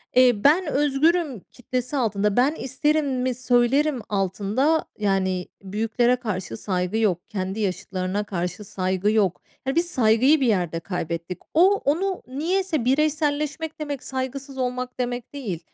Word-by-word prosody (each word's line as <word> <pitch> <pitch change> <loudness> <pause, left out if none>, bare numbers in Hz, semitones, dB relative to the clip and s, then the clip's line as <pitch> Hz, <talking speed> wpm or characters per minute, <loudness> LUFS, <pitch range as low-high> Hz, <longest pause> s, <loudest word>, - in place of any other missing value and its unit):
Eee, 250 -1 +7
ben 335 +5 +5
özgürüm 295 - +2
kitlesi 255 +3 -3
altında 210 -3 +1
"Ben 275 +5 +3
isterimi 265 -3 0
söylerim." 255 +3 +2
altında 205 - +1
yani 190 -3 0 0.2
büyüklere 225 +5 +1
karşı 185 - -4
saygı 185 +2 -1
yok. 190 -6 0
Kendi 190 0 -3
yaşıtlarına 190 0 -2
karşı 180 0 -3
saygı 190 0 0
yok. 200 -5 +1 0.3
Ya, 270 - 0
biz 335 +1 +3
saygıyı 255 +2 +4
bir 260 - +3
yerde 175 -6 +1
kaybettik. 170 -1 -4 0.2
O 370 +5 +6
onu 365 +6 0
niyeyse 315 +1 -1
bireyselleşmek 300 +2 0
demek, 290 -3 -4
saygısız 265 +1 -5
olmak 250 0 -3
demek 245 +1 -3
değil. 210 - -4
250 Hz, 130 wpm, -24 LUFS, 200-290 Hz, 0.3 s, Eee